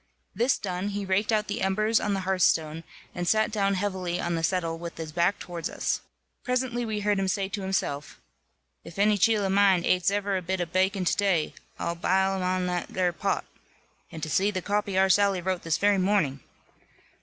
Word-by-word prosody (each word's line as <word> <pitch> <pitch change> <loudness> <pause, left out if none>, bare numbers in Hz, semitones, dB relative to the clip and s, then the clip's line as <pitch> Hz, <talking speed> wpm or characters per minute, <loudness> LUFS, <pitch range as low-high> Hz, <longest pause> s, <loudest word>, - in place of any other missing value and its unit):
This 245 +3 +2
done, 185 0 -3
he 205 0 -3
raked 195 +3 +1
out 215 -1 +2
the 205 +3 -4
embers 215 +4 +2
on 205 -1 -1
the 195 - -2
hearthstone, 165 -4 +1 0.3
and 175 -1 -3
sat 215 +3 +2
down 200 -2 +1
heavily 185 -2 -2
on 175 - -1
the 165 - -1
settle 165 -1 -1
with 170 0 -7
his 160 -1 -6
back 175 +4 +1
towards 170 -2 -5
us. - - -2 0.4
Presently 250 -1 -1
we 215 -1 -2
heard 205 -1 +1
him 195 - 0
say 195 0 0
to 200 0 -4
himself, 170 -7 -3 0.6
"If 170 - -12
any 210 +1 +4
cheel 210 +1 +3
of 190 - 0
mine 195 -3 +4
ates 180 0 +3
ever 200 -1 0
a - - -3
bit 185 +2 -2
of 175 -1 -4
bakkon 190 0 +1
to - - +2
day, 190 -6 +1 0.2
I'll 170 - -2
bile 190 +3 +1
him 185 0 0
in - - -1
that 180 -1 -2
there 180 -2 0
pot. 195 +3 -1 0.7
And 160 -2 -8
to 155 - -2
zee 190 +8 +2
the 185 -3 -3
copy 205 -2 -1
our 190 0 +5
Sally 200 0 +3
wrote 185 0 -2
this 165 -2 0
very 205 -1 +3
morning!" 185 -8 +1
190 Hz, 210 wpm, -27 LUFS, 175-205 Hz, 0.7 s, our